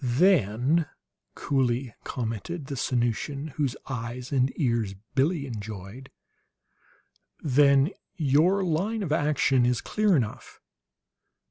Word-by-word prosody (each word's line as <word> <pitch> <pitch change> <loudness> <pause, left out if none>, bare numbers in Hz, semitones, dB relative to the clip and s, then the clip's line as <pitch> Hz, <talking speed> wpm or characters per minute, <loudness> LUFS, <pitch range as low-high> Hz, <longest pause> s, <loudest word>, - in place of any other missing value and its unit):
"Then," 135 - +3 0.5
coolly 130 -3 0
commented 125 - -4
the 140 - -5
Sanusian 130 +4 -1
whose 140 -3 -2
eyes 125 0 -5
and 130 -1 +2
ears 115 -8 0 0.2
Billie 145 +3 +1
enjoyed; 110 +1 -8 1.3
"then 140 +2 +4 0.2
your 165 +5 +3
line 195 +6 -1
of 165 - -3
action 145 -4 +2
is 125 0 +2
clear 210 -3 +1
enough. 115 -6 -4
135 Hz, 100 wpm, -27 LUFS, 120-155 Hz, 1.3 s, then